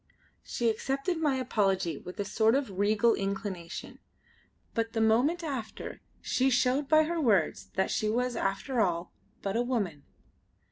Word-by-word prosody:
She 240 - -2
accepted 275 - -1
my 295 -4 +2
apology 195 -9 +1
with 180 - -10
a 205 - 0
sort 220 +3 +3
of 245 -9 -2
regal 215 +3 +4
inclination; 195 -3 -4 0.7
but 225 0 -1
the 225 - 0
moment 250 +11 +3
after 260 -8 -5 0.2
she 260 +1 +2
showed 260 +2 +2
by 310 0 +6
her 335 +1 -1
words 205 - +2 0.2
she 215 - 0
was 245 +2 0
after 225 +5 0
all 175 -3 -1 0.3
but 195 +1 -2
a 235 - +2
woman! 210 - -1
225 Hz, 145 wpm, -29 LUFS, 200-265 Hz, 0.7 s, by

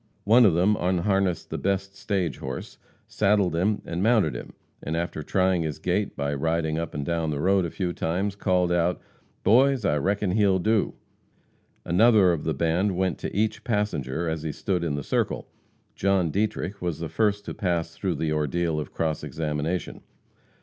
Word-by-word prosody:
One 115 +3 +6
of 85 - +2
them 95 +5 +3
unharnessed 95 0 0
the - - -3
best 100 0 -1
stage 95 - -2
horse, 65 -1 -6 0.3
saddled 100 -4 +2
him 100 +5 0
and 85 +1 -3
mounted 110 -7 +3
him, - - -8 0.3
and 80 - -3
after 85 -2 -3
trying 95 +2 +1
his 80 -3 -3
gait - - -1
by 70 0 -1
riding 80 +2 0
up 85 -3 -5
and 70 -1 -3
down 85 -1 -1
the 75 -2 -2
road 95 +2 +3
a - - -3
few 90 0 -3
times, 95 +5 -1
called 90 -3 +1
out: 85 0 +1 0.4
"Boys, 130 +1 +4
I 75 - +2
reckon 100 +5 0
he'll 100 -1 +3
do!" 110 +3 +1 0.9
Another 105 +1 +5
one - - +3
of 80 - -4
the 80 -2 0
band 85 +6 +1
went 95 -1 0
to - - -5
each 110 +2 0
passenger 95 - -1
as 80 -1 -2
he 80 -1 -3
stood 90 +2 -2
in 80 -4 -1
the 70 - -4
circle. - - -1 0.5
John 95 -4 +1
Dietrich 100 0 -2
was 85 -4 -2
the 85 - -4
first 105 +2 0
to - - -5
pass 85 -3 -1
through 95 -4 -2
the 80 +1 -1
ordeal 75 +2 0
of 75 - -6
cross 80 -2 -2
examination. 80 +3 -3
90 Hz, 185 wpm, -25 LUFS, 80-100 Hz, 0.9 s, One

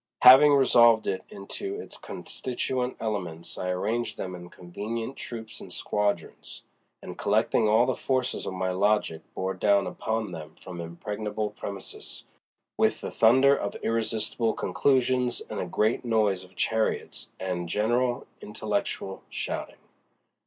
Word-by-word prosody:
Having 140 +3 +10
resolved 120 -4 +6
it 95 - -2
into 390 - -6
its - - -8
constituent 125 0 -3
elements 90 -7 -4
I 90 - -2
arranged 110 +4 -1
them 90 - -4
in 90 -1 -9
convenient 110 +9 -5
troops 110 -2 -7
and - - -10
squadrons, 105 -5 -2 0.4
and - - -8
collecting 110 +1 +2
all 110 +3 +5
the 130 - +1
forces 130 -1 -1
of - - -3
my 95 0 -1
logic 95 -4 +1
bore 95 +1 -1
down 100 +1 +3
upon 110 -3 -2
them 80 -2 -8
from 90 -2 -8
impregnable 105 +5 -4
premises 100 -2 -6 0.6
with - - +2
the - - -4
thunder 130 +5 +5
of - - -3
irresistible 115 0 0
conclusions 125 +4 +1
and - - -3
a - - -2
great 110 +2 +1
noise 105 -5 +1
of 95 +1 -17
chariots 110 +3 -1
and 90 -2 -3
general 120 +5 +1 0.2
intellectual 95 0 -3
shouting. - - -4
110 Hz, 135 wpm, -27 LUFS, 95-120 Hz, 0.6 s, Having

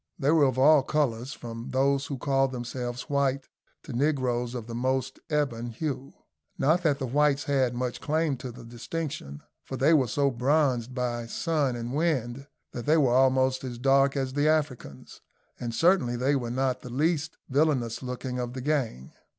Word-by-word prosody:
They 140 +2 +2
were 160 -3 +5
of 130 -2 0
all 145 +2 +6
colours, 130 -3 -1
from 115 -1 -8
those 140 +1 +1
who 140 - -4
called 135 0 +1
themselves 120 0 -4
white 140 -2 0 0.4
to - - -8
negroes 125 -3 0
of 120 -3 -5
the 115 - -8
most 130 +2 -1
ebon 130 -6 -1
hue. 135 +2 -4 0.4
Not 160 +6 +3
that 150 -5 +2
the 135 - -3
whites 145 +2 +2
had 130 -3 +1
much 125 0 -3
claim 155 -1 0
to 130 0 -7
the 120 0 -12
distinction, 120 - -6 0.2
for 130 - -6
they 140 +6 +4
were 135 -5 +4
so 140 +4 +1
bronzed 130 -1 +1
by 120 -2 -2
sun 145 -2 0
and 120 +1 -5
wind 140 -4 -1 0.2
that 120 - -7
they 155 +2 +5
were 135 -6 +3
almost 130 0 +3
as 125 -2 -5
dark 135 +2 +3
as 130 -1 -2
the 145 +2 +2
Africans, 140 - -2 0.4
and 120 - -3
certainly 160 -2 +3
they 130 +4 +1
were 120 -3 -2
not 130 +1 -1
the 125 - -9
least 155 +4 0
villainous 135 -5 +1
looking 125 0 -4
of 125 0 -3
the 130 - -5
gang. 125 - -2
130 Hz, 180 wpm, -27 LUFS, 120-145 Hz, 0.4 s, all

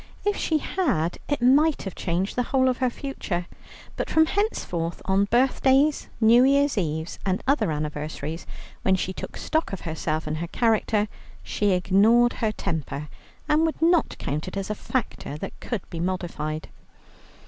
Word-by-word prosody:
If 410 0 +2
she 320 - +1
had, 255 - -1
it 290 -4 0
might 290 +5 +4
have 195 - -5
changed 180 +3 -2
the 250 - +2
whole 260 -1 +3
of 250 - 0
her 255 -1 +2
future. 225 -9 -4 0.5
But - - -3
from 320 0 +5
henceforth, 180 - -1
on 195 +1 +3
birthdays, 265 +5 +3
New 235 +2 +6
Year's 280 +1 +3
Eves, 160 -4 -2
and 190 -1 -1
other 275 - +2
anniversaries, 150 +1 -4 0.3
when 190 - +3
she 185 0 -2
took - - -7
stock 315 +1 -1
of 195 - -5
herself 160 -1 -2
and 155 0 -2
her 170 +2 -3
character, 220 0 +1 0.4
she 205 -2 +1
ignored 210 +7 +4
her 220 -2 +2
temper, 150 -6 -4 0.4
and 300 +1 +3
would 320 -1 0
not 335 0 +3
count 150 +4 -3
it 185 - -5
as 195 +1 -3
a - - +1
factor 215 - -3
that - - -7
could 230 -7 -4
be 165 - -5
modified. 170 -4 -3
200 Hz, 165 wpm, -25 LUFS, 170-265 Hz, 0.5 s, New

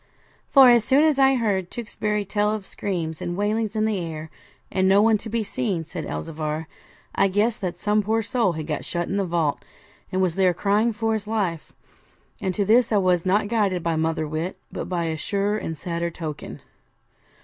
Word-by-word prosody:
'For 265 -3 +8
as 235 -2 +5
soon 270 +6 +4
as 305 -3 +3
I 270 0 +5
heard 200 -7 0
Tewkesbury 210 -3 -3
tell 210 +1 +1
of 215 -2 -4
screams 165 -7 -4
and 175 0 -3
wailings 215 +1 0
in 215 0 +1
the 215 -3 0
air, 160 -2 -6 0.4
and 190 0 +2
no 195 +1 +6
one 215 0 +4
to 225 - -8
be 230 0 -1
seen,' 205 -8 -2
said 160 -1 -6
Elzevir, 155 0 -4 0.5
'I - - +3
guessed 215 +4 0
that 180 -2 -3
some 210 +3 +1
poor 220 +2 0
soul 230 -5 +1
had 155 -1 -5
got 150 -1 -3
shut 175 -1 -3
in 195 - -2
the 200 - +1
vault, 165 -4 0 0.5
and 185 - 0
was 185 -3 +2
there 185 -1 +2
crying 210 +5 +2
for 225 0 -1
his 215 -1 -3
life. 195 -8 -2 0.7
And 190 -3 -1
to 200 - +1
this 235 +4 +4
I 210 - +4
was 185 -2 +2
not 205 +3 +2
guided 200 -6 0
by 165 -1 0
mother 160 0 0
wit, 160 +4 -3
but - - -5
by 175 -2 -1
a 160 -1 -2
surer 205 +4 -1
and 165 - -4
a - - -8
sadder 170 +1 -3
token. 160 -3 -7
195 Hz, 205 wpm, -24 LUFS, 170-215 Hz, 0.7 s, For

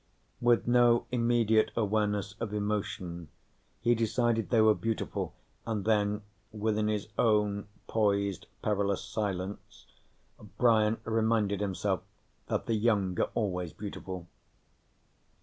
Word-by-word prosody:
With 120 -1 +3
no 120 -1 +4
immediate 115 -2 +3
awareness 105 -2 0
of 105 -2 -3
emotion, 95 -5 -3 0.5
he 120 +1 +4
decided 115 0 +1
they 115 - +3
were 110 0 +6
beautiful, 115 +1 -3 0.3
and 110 -4 -3
then, 105 -1 +1 0.3
within 110 0 0
his 105 -1 -2
own 105 -2 +2 0.2
poised, 100 -4 0 0.2
perilous 100 -2 0
silence, 100 -3 -4 0.7
Brian 110 -2 +4
reminded 110 -3 +1
himself 95 -3 -1 0.5
that - - -1
the 115 - 0
young 105 -4 +2
are - - +2
always 90 -6 -1
beautiful. 95 -3 -6
105 Hz, 110 wpm, -30 LUFS, 100-115 Hz, 0.7 s, were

